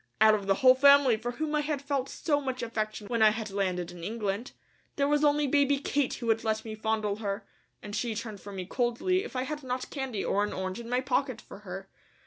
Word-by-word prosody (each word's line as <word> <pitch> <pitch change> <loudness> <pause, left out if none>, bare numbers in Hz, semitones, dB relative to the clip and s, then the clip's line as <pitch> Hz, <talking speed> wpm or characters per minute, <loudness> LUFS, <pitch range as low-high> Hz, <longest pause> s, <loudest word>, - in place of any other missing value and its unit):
Out 215 0 +7
of 200 -2 -1
the 195 - +4
whole 255 +4 +7
family, 280 -2 +6
for 240 +3 -4
whom 305 +4 -3
I 300 - +2
had 295 -1 -2
felt 280 -1 -2
so 290 -3 0
much 260 -3 -3
affection 215 -2 -3
when 230 +2 -1
I 215 - +8
had 215 -1 -4
landed 185 -3 -1
in 175 -1 -10
England, 210 +3 -3 0.4
there 280 -1 +2
was 295 +1 +2
only 295 0 +4
baby 285 0 +3
Kate 285 0 0
who 240 - -7
would 225 -1 +2
let 220 0 -1
me 220 - -5
fondle 215 -1 -1
her, 200 -1 -3 0.4
and 205 0 -6
she 235 -3 -1
turned 215 -3 -6
from 200 -1 -9
me 185 -1 -4
coldly 245 - 0
if - - -9
I 255 - 0
had 300 +2 -4
not 255 -1 -4
candy 265 -8 -3
or 205 - +2
an 210 - -2
orange 185 +3 -4
in 235 0 -8
my 250 +1 +1
pocket 260 -2 0
for 200 - -12
her. 195 -1 -8
235 Hz, 240 wpm, -29 LUFS, 210-275 Hz, 0.4 s, I